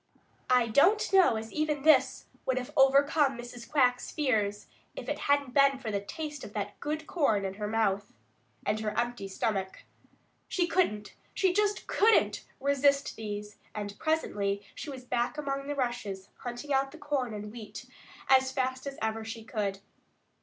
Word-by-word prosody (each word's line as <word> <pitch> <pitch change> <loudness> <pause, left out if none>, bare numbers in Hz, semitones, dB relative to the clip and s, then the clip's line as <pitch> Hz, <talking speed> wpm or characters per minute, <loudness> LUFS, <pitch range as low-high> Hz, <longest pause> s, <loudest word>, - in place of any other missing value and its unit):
I 250 -2 +5
don't 355 - +3
know 375 -11 +6
as 220 0 -5
even 300 -2 -1
this 310 0 +4 0.2
would 260 -1 +1
have 250 -1 -4
overcome 275 +1 +4
Mrs. 240 0 -9
Quack's 250 -4 +2
fears 215 -9 0 0.3
if - - -7
it - - -2
hadn't 285 -3 +2
been 275 -1 +5
for 240 -5 -5
the 200 -1 -1
taste 295 +6 -6
of 205 - -9
that 205 -1 -4
good 310 +1 -3
corn 225 - +1
in 190 - -3
her 210 +1 -4
mouth, 205 -2 0 0.5
and 215 +1 0
her 215 -1 -3
empty 240 -4 -2
stomach. 195 -1 -2 0.6
She 355 - +1
couldn't, 325 - 0 0.2
she 375 -2 +2
just 415 +1 +1
couldn't 445 +2 +3 0.2
resist 280 0 +2
these, 210 -1 -6 0.2
and 205 -1 -4
presently 205 -11 -1
she 310 - -7
was 260 -2 -8
back 245 +3 -1
among 275 -1 -3
the 290 - -2
rushes, 240 -7 -3
hunting 245 +4 -5
out 270 0 +2
the 320 - -11
corn 290 -5 -2
and 210 0 -6
wheat 225 -2 -9 0.4
as 265 0 +5
fast 260 0 -2
as 275 - -6
ever 220 0 -1
she 225 0 -7
could. 205 -3 -3
250 Hz, 165 wpm, -30 LUFS, 215-285 Hz, 0.6 s, know